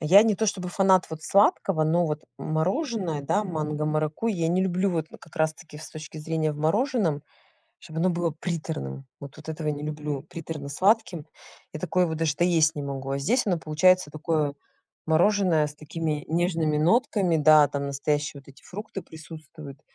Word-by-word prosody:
Я 185 +7 +7
не 220 -2 +2
то 220 +2 0
чтобы 185 -3 -2
фанат 190 0 +3
вот 160 0 -7
сладкого, 195 -4 +3
но 170 +2 +2
вот 150 0 -3 0.2
мороженое, 180 - -1
да, 205 +9 +1
манго-маракуйя 155 +4 -1
я 165 -1 0
не 185 +2 +2
люблю 190 +1 +1
вот 160 -2 -1
как 165 +1 -17
раз-таки 155 -1 -2
с 155 - -10
точки 155 0 -9
зрения 155 0 -1
в - - -9
мороженом, 175 - +1 0.6
чтоб 160 +1 -8
оно 185 +3 +3
было 170 -1 0
приторным. 150 - -5
Вот 140 0 -10
вот 155 +1 -13
этого 155 -1 -3
не 145 0 -2
люблю 150 -2 -4
приторно-сладким. 165 +4 -1 0.5
Я 155 - -6
такое 180 -1 +1
вот 160 -1 -3
даже 160 -2 0
доесть 165 -3 +3
не 145 - -4
могу. 135 -1 -5
А 140 - -1
здесь 230 - +1
оно 180 -4 +1
получается 160 +2 +3
такое 155 -2 -1 0.5
мороженое 170 -1 +3
с 150 - -9
такими 150 0 -3
нежными 165 -2 +1
нотками, 195 - +2
да, 150 -1 +6
там 140 0 -3
настоящие 145 +1 -2
вот 140 - -23
эти 135 - -16
фрукты 200 0 -7
присутствуют. 155 -3 -11
160 Hz, 170 wpm, -26 LUFS, 150-180 Hz, 0.6 s, Я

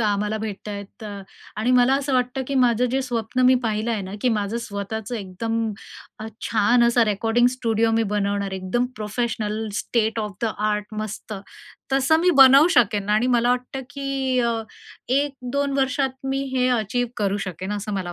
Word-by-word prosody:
आम्हाला 210 0 0
भेटत 215 -1 -6
आहेत 200 +3 -8
अ, 200 -2 -7 0.3
आणि 225 +4 0
मला 250 +2 +5
असं 280 0 -1
वाटतं 250 +1 0
की 280 - -2
माझं 240 0 +2
जे 265 +2 +1
स्वप्न 245 -1 -2
मी 260 - +6
पाहिलं 220 +1 -1
आहे 215 -3 -1
ना, 190 +1 -7
की 255 - +2
माझं 205 +3 -2
स्वतःचं 220 +1 -5
एकदम 225 +3 -3 0.6
अ, 220 - -5 0.2
छान 230 +2 +3
असा 235 0 +4
रेकॉर्डिंग 225 +3 +2
स्टुडिओ 225 -2 +1
मी 225 - +3
बनवणार 200 -1 -1
आहे 190 - -4
एकदम 215 +7 -1
professional, 215 0 -2
state 225 0 0
of 210 -1 -4
the 225 -2 +1
art 210 0 -1
मस्त, 215 0 -5 0.6
तसं 270 +4 +4
मी 360 - +4
बनवू 275 +4 +8
शकेन 205 -3 +1
आणि 215 +4 +3
मला 240 +1 +2
वाटतं, 250 +2 -2
की 275 -2 -1
अ, 235 -1 0 0.5
1-2 275 0 -1
वर्षात 265 -1 -1
मी 270 0 -1
हे 255 0 +3
अचीव्ह 235 +3 -2
करू 200 -2 0
शकेन, 185 +3 -5
असं 205 0 -4
मला 180 -2 -3
225 Hz, 175 wpm, -23 LUFS, 210-250 Hz, 0.6 s, बनवू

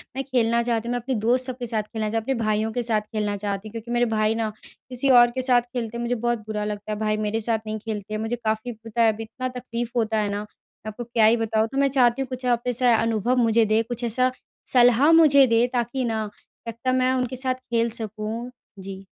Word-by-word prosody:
मैं 270 - -2
खेलना 235 -3 +1
चाहती 235 -1 -1
हूँ, - - -2
मैं 245 - -1
अपने 255 +2 -3
दोस्त 240 +4 +1
सब 255 -1 -4
के 245 - -5
साथ 225 -2 -1
खेलना 215 0 -4
चाह, 225 +1 -1
अपने 265 +5 -1
भाइयों 215 -1 0
के 245 +2 -2
साथ 220 -2 +1
खेलना 210 -1 -3
चाहती। 200 +1 -4
क्योंकि 230 +2 -8
मेरे 240 0 +2
भाई 215 +1 +2
ना 225 -1 -1 0.4
किसी 255 +2 -1
और 240 -2 +8
के 260 +2 -3
साथ 250 -1 +3
खेलते 240 -2 -5
हैं - - -4
मुझे 240 +1 0
बहुत 240 0 -1
बुरा 210 -1 -3
लगता 210 0 -5
है, 210 - -2
भाई 215 -1 0
मेरे 215 +1 -1
साथ 225 0 0
नहीं 215 0 -3
खेलते 215 -1 -5
मुझे 225 +2 -2
काफ़ी 220 +3 -1
पता 225 0 -4
है 225 -1 +5
अब 215 - -13
इतना 225 +3 -5
तकलीफ़ 240 -1 -4
होता 220 -1 +1
है 210 -1 0
ना, 205 0 -2
मैं 210 0 -13
आपको 240 +3 -7
क्या 230 -2 +2
ही 225 +2 +5
बताऊँ। 220 -1 0
तो 270 - -4
मैं 275 0 +4
चाहती 240 +1 +4
हूँ 265 - -3
कुछ 255 0 -6
आप 240 -1 +1
ऐसा 245 -1 +3
अनुभव 230 +2 +1
मुझे 230 -1 +3
दें, 215 +1 +2
कुछ 240 +1 -6
ऐसा 255 +2 +1 0.4
सलाह 245 +4 +5
मुझे 295 -4 +7
दें 230 +1 +3
ताकि 245 +1 -1
ना, 220 -2 -2 0.4
लगता 230 +3 -2
मैं 255 0 +2
उनके 255 -1 -1
साथ 255 0 0
खेल 235 -2 -1
सकूँ। 225 +1 -4 0.3
जी। 190 0 -8
230 Hz, 240 wpm, -24 LUFS, 215-245 Hz, 0.4 s, और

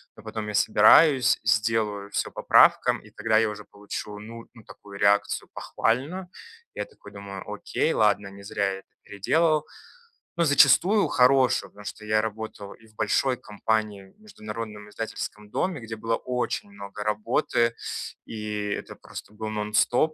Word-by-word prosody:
Но 110 - -15
потом 110 -1 -5
я 105 - -4
собираюсь, 125 +6 +5
сделаю 105 -3 0
всё - - -2
по - - -7
правкам, - - +5
и - - -18
когда 110 -1 +1
я 110 0 +3
уже 105 -1 -8
получу, 105 0 -7
ну 115 +2 -10
ну, 115 - -14
такую 100 -1 -13
реакцию, 100 0 +2
похвальную, 155 +11 -2 0.4
я - - -4
такой 450 - -16
думаю: 100 -1 -8
"Окей, - - -1
ладно, 105 -2 +2
не 100 0 -12
зря 100 0 -1
я 95 - -6
это - - -21 0.2
переделывал". 155 - +1 0.7
Но 170 - +3
зачастую 155 +8 +5
хорошую, 130 0 +3
потому 105 0 -14
что 110 - -7
я 110 0 +2
работал 110 -2 -6
и 110 - -20
в 110 - -25
большой 130 +3 +1
компании, 105 -2 -2
в - - -28
международном 110 - -8
издательском 105 -1 -6
доме, 180 - -1
где 115 0 -6
было 115 +1 -1
очень 125 -5 -3
много 100 +1 -8
работы, 115 +2 +1 0.5
и 105 -2 -4
это - - -5
просто - - -11
был 110 0 -6
нон-стоп. 110 +8 +1
110 Hz, 160 wpm, -26 LUFS, 105-120 Hz, 0.7 s, собираюсь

